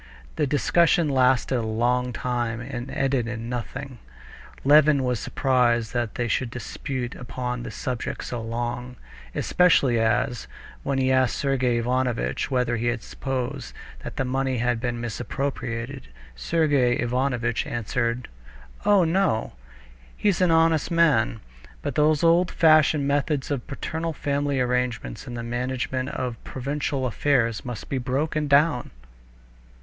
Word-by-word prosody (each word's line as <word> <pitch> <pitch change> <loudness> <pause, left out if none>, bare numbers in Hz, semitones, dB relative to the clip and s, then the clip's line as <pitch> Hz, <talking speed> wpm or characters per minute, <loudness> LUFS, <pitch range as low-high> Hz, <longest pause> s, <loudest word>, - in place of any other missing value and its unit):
The - - +1
discussion 165 +3 +3
lasted 130 -1 +3
a - - -1
long 120 +3 0
time 120 -2 -2
and 120 0 -6
ended 135 -3 0
in 115 0 -5
nothing. 125 +2 -5 0.6
Levin 145 0 +5
was 125 -3 0
surprised 120 -4 +1
that 120 -3 -2
they 120 - -1
should 120 +3 0
dispute 125 +1 -5
upon 125 0 -4
this - - -7
subject 125 -3 -4
so 120 -2 -4
long, 120 +2 -4 0.4
especially 140 -9 +3
as, 120 - 0 0.3
when 140 -1 -1
he 130 0 +2
asked 130 -2 +3
Sergey 130 -4 +1
Ivanovitch 125 0 -1
whether 125 -3 +1
he 120 +1 0
supposed 130 +1 -4 0.2
that - - -8
money 130 0 0
had 120 0 0
been 120 -1 -2
misappropriated, 120 +1 -4 0.3
Sergey 140 - +2
Ivanovitch 120 -1 0
answered: 120 +1 -2 0.6
"Oh, 205 -3 +5
no! 165 - +1 0.6
He's 200 -3 +1
an 180 - +4
honest 165 -2 +3
man. 150 -10 +3 0.4
But 145 - -2
those 150 +2 +3
old 170 +2 +4
fashioned 155 -3 +4
methods 145 0 0
of 135 -4 -3
paternal 160 +4 -3
family 140 -1 -1
arrangements 125 - -1
in 120 - -6
the 120 - -4
management 125 +2 -2
of 125 -2 -4
provincial 135 0 -2
affairs 120 -3 +1
must 125 -3 -6
be 135 - -2
broken 145 +4 -1
down." 140 -2 +3
125 Hz, 130 wpm, -25 LUFS, 120-140 Hz, 0.6 s, Levin